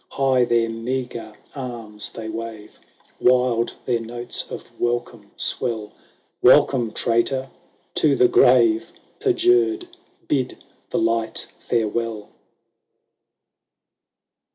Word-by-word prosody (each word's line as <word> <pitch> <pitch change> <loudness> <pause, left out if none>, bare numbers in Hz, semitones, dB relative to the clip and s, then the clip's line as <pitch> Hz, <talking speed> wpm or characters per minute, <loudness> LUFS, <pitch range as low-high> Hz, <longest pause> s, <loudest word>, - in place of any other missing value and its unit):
High 130 -2 +2
their 115 -1 +2
meagre 115 -1 -4 0.2
arms 115 -6 -4
they 110 -1 -7
wave, 110 -1 -7 0.4
Wild 125 -2 +2
their 120 -2 +1
notes 120 +1 -5
of - - -6 0.2
welcome 120 -3 -2
swell; 110 -4 -2 0.3
" - - -43
Welcome, 120 -5 +5
traitor, 130 +3 0 0.4
to - - +3
the 380 - +5
grave! 360 -3 +4 0.3
Perjured, 365 -2 +2 0.4
bid 130 -3 0 0.3
the - - -1
light 115 0 0
farewell 115 -1 -2
120 Hz, 95 wpm, -22 LUFS, 115-130 Hz, 0.4 s, Welcome